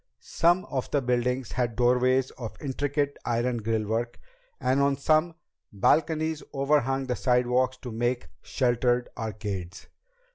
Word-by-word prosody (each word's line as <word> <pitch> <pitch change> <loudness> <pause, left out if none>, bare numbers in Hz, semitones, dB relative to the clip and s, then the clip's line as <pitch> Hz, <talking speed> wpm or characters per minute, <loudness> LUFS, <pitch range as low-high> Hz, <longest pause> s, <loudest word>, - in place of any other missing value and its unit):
Some 175 +2 +2
of 130 -3 -3
the 145 - +2
buildings 125 0 -1
had 120 -2 -1
doorways 125 +1 +3
of 115 -4 -8
intricate 145 +1 -2
iron 120 +1 0
grillwork, 110 +2 -1 0.4
and 130 +2 +2
on 140 0 +2
some, 155 +3 +2 0.4
balconies 160 +8 +1
overhung 135 -1 +1
the 125 -1 -1
sidewalks 125 0 +1
to 125 - -5
make 120 +2 -1
sheltered 120 -1 +1
arcades. 105 -5 -5
125 Hz, 120 wpm, -27 LUFS, 120-140 Hz, 0.4 s, doorways